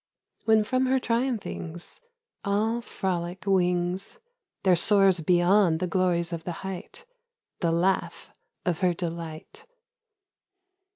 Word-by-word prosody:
When 220 -1 +4
from 255 +4 0
her 265 +1 +3
triumphings, 230 -9 -3 0.4
All 220 +4 0
frolic 180 -4 -3
wings 180 - 0 0.5
There 185 -2 +5
soars 195 0 +5
beyond 175 +1 +3
the 185 - -1
glories 180 -2 0
of 165 -1 -5
the 175 - -4
height, 190 -2 -7 0.5
The 170 -2 +1
laugh 180 +3 -1 0.3
of 175 -3 0
her 180 -2 +2
delight! 165 -2 -7
185 Hz, 110 wpm, -26 LUFS, 170-200 Hz, 0.5 s, There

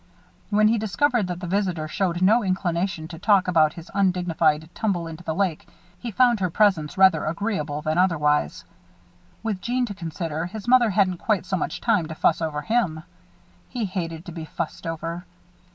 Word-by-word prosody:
When 215 0 +4
he 230 0 +2
discovered 220 +1 +1
that 180 0 -5
the - - -4
visitor 180 -4 -1
showed 180 +1 -1
no 220 +5 +5
inclination 185 -3 -1
to 165 -2 -9
talk 195 -1 +3
about 160 -4 +3
his 170 +1 -11
undignified 175 -5 +1
tumble 190 -6 -1
into 165 +1 -8
the 160 -2 -3
lake, 185 -5 -1 0.3
he 240 - -5
found 240 +1 +3
her 185 -2 0
presence 175 -5 +2
rather 190 -5 +5
agreeable 155 -4 -2
than 155 +2 0
otherwise. 150 - +1 0.8
With 210 -4 -2
Jeanne 250 +1 0
to 210 - -6
consider, 165 -2 -4
his 215 +4 -8
mother 245 -2 +5
hadn't 190 -2 +2
quite 210 -5 0
so 190 - -1
much - - -3
time 210 -9 +2
to 160 - -7
fuss 160 - +2
over 155 -2 -2
him. 180 -7 0 0.7
He 240 -4 -2
hated 170 -3 -4
to 175 - -7
be 160 -1 -7
fussed 165 +1 -5
over. 165 +1 -4
180 Hz, 180 wpm, -24 LUFS, 160-205 Hz, 0.8 s, no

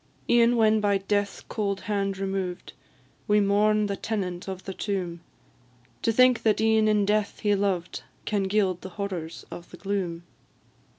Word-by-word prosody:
E'en 240 0 +5
when 220 -1 +4
by 205 -1 +3
death's 200 +1 -1
cold 200 -3 -3
hand 195 -2 -1
removed, 190 -2 -3 0.5
We 210 0 +4
mourn 210 +1 +3
the 200 -1 -2
tenant 190 -5 -3
of 190 -1 -6
the 190 - -6
tomb, 180 -4 -3 0.8
To 230 - +2
think 255 +1 +5
that 215 -2 +2
e'en 220 0 +3
in 210 -1 +3
death 210 0 0
he 210 -1 +2
loved, 195 -3 -1 0.2
Can 205 -2 0
gild 190 -3 +1
the 190 - -7
horrors 185 -5 -5
of 175 - -9
the 180 - -12
gloom. 185 -4 -3
200 Hz, 160 wpm, -26 LUFS, 190-215 Hz, 0.8 s, E'en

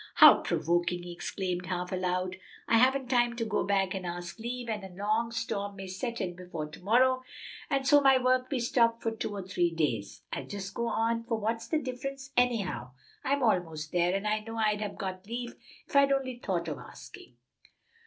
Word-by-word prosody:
"How - - +10
provoking!" 175 +2 0
he 175 - -7
exclaimed 180 0 -3
half 180 -1 -3
aloud. 185 0 -1 0.3
"I 230 - +5
haven't 260 +1 +3
time 240 -1 +2
to 230 -1 -2
go 215 -1 0
back 195 -2 +1
and 190 -1 -4
ask 175 +3 -5
leave, 240 +1 -4
and 215 -3 -3
a 190 - -7
long 210 +5 0
storm 220 -3 -3
may 195 0 -7
set 230 +6 -4
in 180 -2 -3
before 175 -4 -5
to 155 - -12
morrow, 255 +6 +4 0.5
and 275 -2 +1
so 290 +1 +6
my 270 -1 +6
work 255 0 +2
be 270 - 0
stopped 230 -1 +2
for 225 - +1
two 225 - -3
or 195 - -4
three 180 -2 +1
days. 130 -12 -2
I'll - - -4
just 195 -1 -6
go 235 0 -1
on, 230 0 0
for 230 -1 -1
what's 225 +2 -2
the 315 - +1
difference, 270 0 -5
anyhow? 220 - +1 0.3
I'm 280 0 +1
almost 165 -8 0
there, 175 +1 +2
and 195 +2 -1
I 215 0 +2
know 225 +1 -7
I'd 210 -1 +1
have 205 -2 -4
got 190 0 -5
leave 240 +1 -4 0.3
if - - -11
I'd 280 0 +6
only 260 -3 0
thought 175 -7 -2
of 155 - -4
asking." - - -12
215 Hz, 205 wpm, -30 LUFS, 180-245 Hz, 0.5 s, How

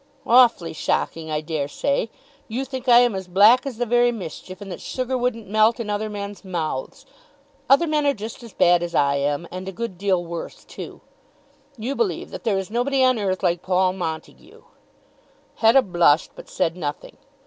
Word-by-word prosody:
"Awfully 235 -9 +4
shocking 160 0 -2
I 155 -1 -1
dare 155 -3 -3
say. 280 - -1 0.4
You 250 +5 -3
think 260 -1 -5
I 240 0 +8
am 245 -2 +2
as 190 -1 -5
black 210 +9 +5
as 255 -5 -6
the 245 - -1
very 240 +1 +3
mischief, 185 -3 -8
and 200 -2 -9
that 180 - -7
sugar 255 0 -3
wouldn't 245 -4 -2
melt 215 +3 +3
in 215 -3 -3
other 210 +1 -2
men's 205 -1 -7
mouths. 170 - -4 0.6
Other 275 +6 +5
men 305 -2 +1
are 280 - +3
just 220 +3 -8
as 230 -2 -11
bad 175 -1 +4
as 175 -1 -4
I 140 0 +3
am, 145 +4 -1
and 185 +1 -7
a - - -3
good 195 -3 -6
deal 190 -3 +1
worse 170 0 -7
too. - - -9 0.8
You 240 +5 -3
believe 440 -5 -2
that - - -8
there 210 -4 +1
is 195 +1 -4
nobody 260 +3 +1
on 255 -3 +3
earth 190 -2 -2
like 175 -1 +1
Paul 185 0 +1
Montague." 165 -4 -7 0.9
Hetta 235 +4 +5
blushed, 175 -5 +3
but - - -13
said 165 - -1
nothing. 150 -5 -6
205 Hz, 190 wpm, -22 LUFS, 175-240 Hz, 0.9 s, I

